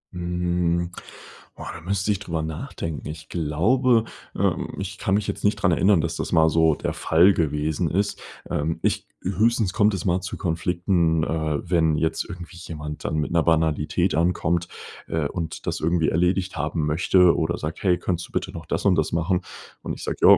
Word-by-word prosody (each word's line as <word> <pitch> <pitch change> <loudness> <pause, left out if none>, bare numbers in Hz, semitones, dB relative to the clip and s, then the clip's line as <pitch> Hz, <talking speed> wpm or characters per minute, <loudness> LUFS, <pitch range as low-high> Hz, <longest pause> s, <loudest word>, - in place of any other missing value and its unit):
Mhm. 85 0 0 0.6
Boah, - - -7
da 80 - -9
müsste 100 +3 0
ich 100 - 0
drüber 80 -2 -3
nachdenken. 80 0 -5
Ich 75 0 -8
glaube 110 - +2 0.3
ähm, - - 0
ich 100 +1 -5
kann 95 - +1
mich 105 - 0
jetzt - - -4
nicht 105 +1 +3
dran 100 -3 +2
erinnern, 95 +1 +4
dass 85 +1 -2
das - - -3
mal 80 -2 +5
so 80 -1 +3
der - - -3
Fall 90 +5 +4
gewesen 80 +1 0
ist. 100 +3 -1 0.3
Ähm, 80 +3 -1
ich - - 0
g 95 - -6
höchstens 110 0 +2
kommt 105 -1 +3
es 95 - -5
mal 90 0 +1
zu 90 - -5
Konflikten, 85 -1 +1
äh, 80 -3 -1
wenn 80 -3 +3
jetzt 80 +1 0
irgendwie 90 0 -8
jemand 75 -3 -7
dann - - -1
mit 75 +1 -1
'ner 85 - +3
Banalität 80 -2 +1
ankommt, 85 0 +1 0.4
äh, 80 -3 -1
und 80 -1 -5
das - - -2
irgendwie 80 -1 +1
erledigt 90 +3 +1
haben 75 +1 -1
möchte 90 +3 +4
oder 80 +2 0
sagt: 75 +1 -5
„Hey 90 -3 +3
könntest 90 -1 -2
du - - -21
bitte - - -2
noch 80 -1 -9
das - - -2
und 95 -3 +5
das 80 -2 0
machen?" 85 +2 +1 0.4
und - - -4
ich - - -8
sage: - - -3
„Ja, - - +8
85 Hz, 195 wpm, -24 LUFS, 80-90 Hz, 0.6 s, Ja